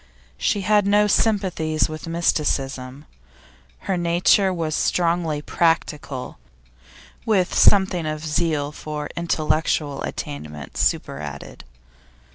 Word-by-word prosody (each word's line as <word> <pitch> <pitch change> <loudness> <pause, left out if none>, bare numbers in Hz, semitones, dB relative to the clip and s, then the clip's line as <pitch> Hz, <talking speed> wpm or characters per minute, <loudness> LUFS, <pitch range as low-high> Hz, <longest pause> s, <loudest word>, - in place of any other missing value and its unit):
She 205 - +1
had 205 +1 +3
no 205 +1 +4
sympathies 190 -7 +1
with 155 +1 -7
mysticism; 140 -5 -1 0.8
her 190 -2 -1
nature 175 +3 +3
was 165 -3 -2
strongly 165 -3 0
practical, 150 -6 -1 0.8
with 200 -6 +1
something 190 -5 +4
of 155 0 -4
zeal 150 -2 0
for 150 -1 -6
intellectual 155 -3 0
attainment 75 0 -6
superadded. 70 -2 -3
160 Hz, 90 wpm, -22 LUFS, 150-180 Hz, 0.8 s, no